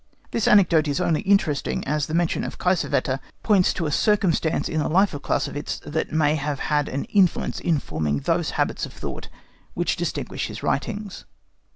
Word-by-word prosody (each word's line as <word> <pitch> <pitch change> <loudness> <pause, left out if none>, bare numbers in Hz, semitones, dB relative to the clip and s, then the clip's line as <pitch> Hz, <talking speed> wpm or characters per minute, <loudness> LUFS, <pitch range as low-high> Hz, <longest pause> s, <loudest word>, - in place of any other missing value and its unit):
This 230 - 0
anecdote 170 -6 +5
is 145 +2 0
only 170 -4 +1
interesting 195 -8 +1
as 150 0 0
the 155 - -2
mention 170 -1 +1
of - - -5
Kiesewetter 165 -7 0 0.2
points 200 -5 +4
to 170 - -2
a 150 - -1
circumstance 190 -4 +1
in 160 - -2
the 150 - 0
life 190 +4 +3
of 145 - -5
Clausewitz 145 +1 -2
that 160 +2 -2
may 150 -1 +2
have 145 -2 -2
had 150 -1 0
an 140 - -2
influence 195 -4 +1
in 165 -3 +1
forming 75 - -2
those - - 0
habits - - 0
of - - -15
thought - - -7 0.5
which - - 0
distinguish - - -3
his - - -8
writings. 205 +6 -3
160 Hz, 180 wpm, -23 LUFS, 145-190 Hz, 0.5 s, anecdote